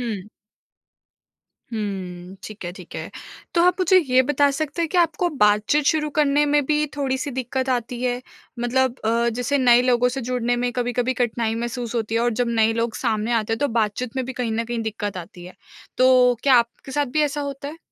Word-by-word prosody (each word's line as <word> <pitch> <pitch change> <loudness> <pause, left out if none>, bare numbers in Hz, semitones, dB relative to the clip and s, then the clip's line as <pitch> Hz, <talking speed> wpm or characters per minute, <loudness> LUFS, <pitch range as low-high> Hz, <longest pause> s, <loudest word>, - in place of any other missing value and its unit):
हुँ। 210 -5 -4 1.4
हुँ। 190 -4 -5
ठीक 215 -3 -9
है, 175 - -3
ठीक 180 -1 -13
है। - - -6 0.4
तो 340 - +4
आप 360 +1 +3
मुझे 370 0 +5
ये 260 -6 +3
बता 285 +1 +2
सकते 305 +3 -2
हैं, 330 - -1
कि 365 - -3
आपको 340 +1 +2
बातचीत 210 +8 +3
शुरू 305 -1 +2
करने 290 0 +3
में 290 0 +2
भी 300 +1 +2
थोड़ी-सी 275 0 -1
दिक्कत 260 +1 -3
आती 240 -1 -2
है? 250 -1 -1 0.4
मतलब, 250 +1 0
अ, 235 +1 +2
जैसे 250 +4 0
नए 245 -2 +5
लोगों 250 -1 +3
से - - -1
जुड़ने 245 -1 0
में 245 0 0
कभी-कभी 245 0 -1
कठिनाई 230 -2 -1
महसूस 240 0 -4
होती 225 -1 -2
है? 230 - +2
और 240 0 +2
जब 245 - +1
नए 220 +1 +4
लोग 230 0 -1
सामने 225 -1 -1
आते 225 -1 0
हैं, 225 - -1
तो 285 - +1
बातचीत 225 +4 -3
में 260 - -1
भी 260 - -4
कहीं 245 -3 -2
न 230 +1 -1
कहीं 240 0 -4
दिक्कत 210 -2 -4
आती 175 0 -9
है। 180 - -11 0.4
तो, 255 -1 +5
क्या 270 -2 +5
आपके 235 +3 0
साथ 290 0 +1
भी 305 - +4
ऐसा 295 0 -1
होता 280 0 -5
है? 320 - -9
245 Hz, 210 wpm, -22 LUFS, 225-275 Hz, 1.4 s, मुझे